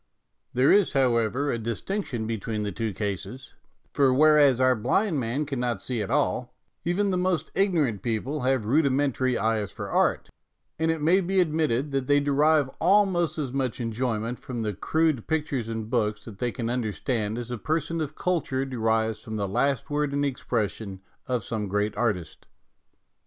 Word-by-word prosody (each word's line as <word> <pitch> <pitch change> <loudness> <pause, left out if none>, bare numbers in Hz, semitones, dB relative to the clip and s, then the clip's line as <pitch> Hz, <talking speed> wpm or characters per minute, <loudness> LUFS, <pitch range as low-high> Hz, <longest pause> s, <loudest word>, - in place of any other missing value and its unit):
There 130 +3 +5
is, 200 -2 +4
however, 130 +1 +2
a 115 - -2
distinction 120 - -3
between 110 -1 -3
the 105 - -2
two 110 +3 -2
cases, 105 +6 -5 0.4
for 140 -2 +4
whereas 145 -2 +5
our 130 0 +4
blind 150 - +1
man 125 +5 -1
cannot 125 -6 -2
see 120 +3 -3
at 105 - -4
all, 130 -2 0 0.3
even 195 +4 +1
the 180 - 0
most 180 -4 0
ignorant 160 - +1
people 120 +6 -2
have 130 -3 +1
rudi 140 +6 +3
mentary 130 -2 +1
eyes 110 -2 0
for - - -7
art; - - +2 0.5
and 160 0 +1
it 160 -2 -1
may 180 +5 +4
be 190 +1 +1
ad 165 -4 +2
mitted 150 -3 0
that 135 -2 -1
they 145 0 +4
derive 145 +1 +3
almost 180 -3 +3
as 135 -5 -3
much 130 -2 -1
enjoy 115 0 -1
ment 115 +3 -4
from 120 -3 -5
the 105 -1 -2
crude 155 - 0
pictures 145 -7 -1
and 110 0 -5
books 105 -3 0
that 105 -4 -10
they 120 -1 0
can 115 -2 -4
understand 115 -2 -2
as 120 0 -5
a 120 - -2
person 160 +3 -1
of 155 0 -4
culture 150 -7 -1
derives 110 -3 0
from 110 - -6
the 100 -2 -1
last 135 +9 0
word 145 -1 0
in 140 0 0
expression 110 -7 -2 0.3
of 125 -4 -1
some 105 0 -3
great 105 +2 -1
artist. 100 -9 -2
130 Hz, 180 wpm, -26 LUFS, 110-150 Hz, 0.5 s, There